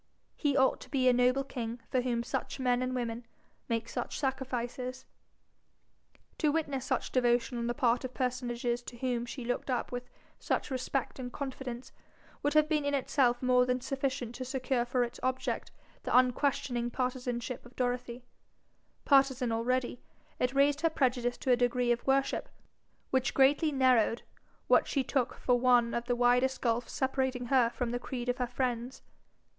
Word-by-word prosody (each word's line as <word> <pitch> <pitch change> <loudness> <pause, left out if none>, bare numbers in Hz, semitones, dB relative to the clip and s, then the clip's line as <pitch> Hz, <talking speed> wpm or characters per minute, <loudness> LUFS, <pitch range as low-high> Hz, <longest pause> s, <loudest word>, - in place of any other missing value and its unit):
He 285 -3 +1
ought 265 -1 +3
to - - -11
be 260 -3 +1
a 250 - +6
noble 250 +2 +3
king 240 -3 -5
for 255 - +2
whom 240 -2 -1
such 240 - -4
men 250 -1 +2
and 255 0 -1
women 235 -1 -3 0.5
make 230 0 -1
such - - -4
sacrifices. 255 -1 -3 1.3
To 300 - +3
witness 285 -4 -1
such - - -1
devotion 245 -1 +2
on 235 - -2
the 240 - -1
part 245 -2 +2
of 255 - -4
personages 245 -1 -1
to 240 0 -10
whom 245 -1 -1
she 240 0 -6
looked 245 +3 -2
up 250 -2 -1
with 245 0 -5 0.3
such - - -1
respect 260 +1 -2
and 245 -1 -5
confidence, 260 -3 -6 0.5
would 290 - 0
have 305 0 +5
been 305 -2 +1
in 285 0 0
itself 255 -2 +1
more 250 0 +5
than 250 0 +1
sufficient 265 -2 -3
to 255 - -5
secure 255 -1 -1
for 245 0 +1
its 240 0 -6
object 255 0 -2 0.3
the - - +2
unquestioning 255 -1 +1
partisanship 250 -1 -3
of 240 +1 -16
Dorothy; 245 -1 -2 0.8
partisan 270 -3 +4
already, 245 +2 -1 0.4
it 250 +2 0
raised 285 +1 +3
her 330 - +3
prejudice 250 -5 0
to 260 - 0
a - - +7
degree 245 0 +1
of 240 +2 -1
worship 270 0 +1 0.6
which 260 -3 +1
greatly 285 +3 +4
narrowed 255 -4 +3 0.4
what - - +4
she 275 - 0
took 255 -2 -1
for 245 -1 +1
one 245 -2 +4
of 235 0 -2
the 245 0 0
widest 245 +2 +3
gulfs 235 0 0
separating 260 -2 -1
her 250 -3 +5
from 240 0 -3
the 245 - -2
creed 250 -1 -5
of 245 - 0
her 250 - 0
friends. 245 0 -3
250 Hz, 170 wpm, -31 LUFS, 245-265 Hz, 1.3 s, a